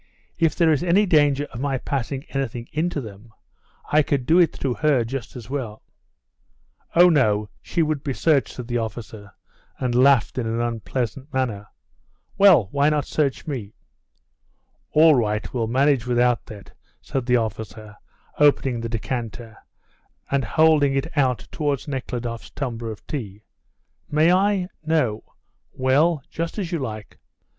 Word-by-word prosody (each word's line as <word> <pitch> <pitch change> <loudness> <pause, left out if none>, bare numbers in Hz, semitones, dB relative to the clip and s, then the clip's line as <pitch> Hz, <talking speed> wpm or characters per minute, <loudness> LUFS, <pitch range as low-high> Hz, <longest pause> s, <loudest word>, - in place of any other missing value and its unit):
If 165 -3 +2
there 165 -2 +3
is 150 - +2
any 180 +4 +3
danger 145 -5 +3
of 120 - -6
my 135 0 -1
passing 135 +1 -3
anything 120 -3 -4
in 160 +4 0
to 150 - -4
them 110 0 -11 0.6
I 150 - +5
could 140 -3 -1
do 165 +5 +4
it 170 -4 +4
through 135 -3 -2
her 145 -6 +3
just 125 0 -6
as 120 -4 -9
well." 125 -5 -5 1.1
"Oh, 175 +1 +8
no; 105 -10 +2
she 170 - 0
would 155 -2 -1
be 140 - -2
searched," 150 -5 +1
said 125 -2 -7
the 120 -1 -1
officer, 110 -2 -7 0.5
and 125 -2 -2
laughed 130 0 +4
in 115 - -2
an 115 +1 -2
unpleasant 120 +3 -3
manner. 115 -7 -2 0.7
"Well, 185 - +6
why 145 +1 +3
not 150 -2 0
search 145 -4 -1
me?" 125 -10 -5 1.2
"All 160 +1 +7
right; 105 -5 -1
we'll 115 -3 -1
manage 130 0 +2
without 120 0 +1
that," 105 -2 -11 0.3
said 130 -3 -4
the 125 -1 +4
officer, 110 -1 -5 0.4
opening 135 -4 +3
the 115 - -4
decanter, 115 0 -5 0.8
and 140 -1 +1
holding 150 +2 +3
it 135 +5 -3
out 125 -9 +1
towards 145 -2 -2
Nekhludoff's 125 -4 -5
tumbler 120 -4 -4
of 100 -4 -11
tea. 105 -8 -6 0.7
"May 155 +4 +4
I? 195 -1 +2 0.2
No? 150 -9 -1 0.4
Well, 140 +4 +2
just 165 +4 -4
as 185 -5 -3
you 170 - -1
like. 110 -6 -7
130 Hz, 150 wpm, -23 LUFS, 115-150 Hz, 1.2 s, Oh